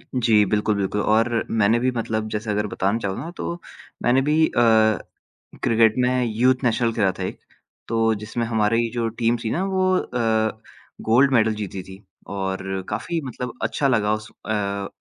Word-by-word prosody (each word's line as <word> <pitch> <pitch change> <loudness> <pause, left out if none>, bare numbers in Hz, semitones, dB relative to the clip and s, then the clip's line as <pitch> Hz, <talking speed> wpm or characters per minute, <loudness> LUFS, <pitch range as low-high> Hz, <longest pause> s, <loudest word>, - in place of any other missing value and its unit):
जी 115 -4 +4
बिल्कुल, 105 +1 +1
बिल्कुल 100 +1 -1
और 115 +2 +2
मैंने 110 +1 +3
भी 130 +1 +1
मतलब 110 -2 -2
जैसे 105 +1 -4
अगर 105 +1 0
बतान 100 +4 -1
चाहूँ 95 -3 -3
ना, 165 - -6
तो 175 -1 -5 0.4
मैंने 125 +2 +4
भी 155 +3 +3
अ, - - -2 1.0
क्रिकेट 115 -1 +4
में 125 0 +2
यूथ 125 +4 +2
नेशनल 115 0 +2
खेला 100 -4 +2
था - - -2
एक। - - -5 0.5
तो 115 0 +2
जिसमें 110 +3 -4
हमारी 115 +1 +1
जो 115 -1 -1
टीम 115 +1 +2
थी 110 - -2
ना 180 - 0
वो 185 -1 +1
अ, 110 -4 -1 0.4
गोल्ड 130 +5 +4
मेडल 110 -3 +3
जीती 100 -3 -5
थी 95 +2 -13 0.3
और 95 -1 -3
काफ़ी 140 +10 -2
मतलब 125 -1 -5
अच्छा 140 - 0
लगा 110 -4 +2
उस 110 0 -5 0.2
अ, 100 -2 -2
110 Hz, 170 wpm, -23 LUFS, 105-125 Hz, 1.0 s, जी